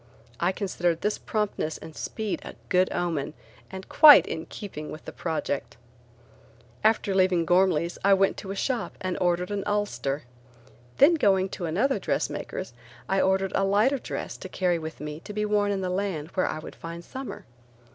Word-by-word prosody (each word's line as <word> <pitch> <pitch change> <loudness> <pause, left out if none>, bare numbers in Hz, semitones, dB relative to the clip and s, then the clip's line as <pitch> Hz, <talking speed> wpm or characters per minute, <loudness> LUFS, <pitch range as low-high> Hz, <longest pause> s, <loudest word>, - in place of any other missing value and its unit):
I 175 +2 +2
considered 175 -4 -1
this 210 +1 -1
promptness 210 -7 -2
and 160 - -11
speed 220 -3 -3
a - - -9
good 185 0 +3
omen 165 -4 -2 0.3
and 190 0 -8
quite 300 -2 +9
in 160 0 -5
keeping 155 -7 -7
with 155 - -9
the - - -6
project. 140 -8 -3 1.1
After 215 -2 +3
leaving 185 -3 +3
Ghormley's 175 -2 +2
I 195 0 +6
went 195 0 +2
to 195 - -8
a 195 - -3
shop 245 +3 -2
and 185 -1 -2
ordered 180 +1 +1
an 205 -1 -1
ulster. 205 -9 -1 0.7
Then 295 +5 +7
going 195 - +3
to 180 - -5
another 215 - +1
dressmaker's, 185 -10 -3 0.3
I 195 0 +2
ordered 190 0 +2
a 195 - +2
lighter 210 +8 +3
dress - - -5
to - - -8
carry 180 -2 0
with 160 -1 -7
me 150 0 -5
to 210 - -9
be 210 0 -1
worn 210 -1 +2
in 195 -1 -1
the 185 - -2
land 180 -5 -2
where 185 0 0
I - - -3
would 155 - -9
find 170 +1 -8
summer. 265 0 -7
190 Hz, 175 wpm, -26 LUFS, 170-205 Hz, 1.1 s, quite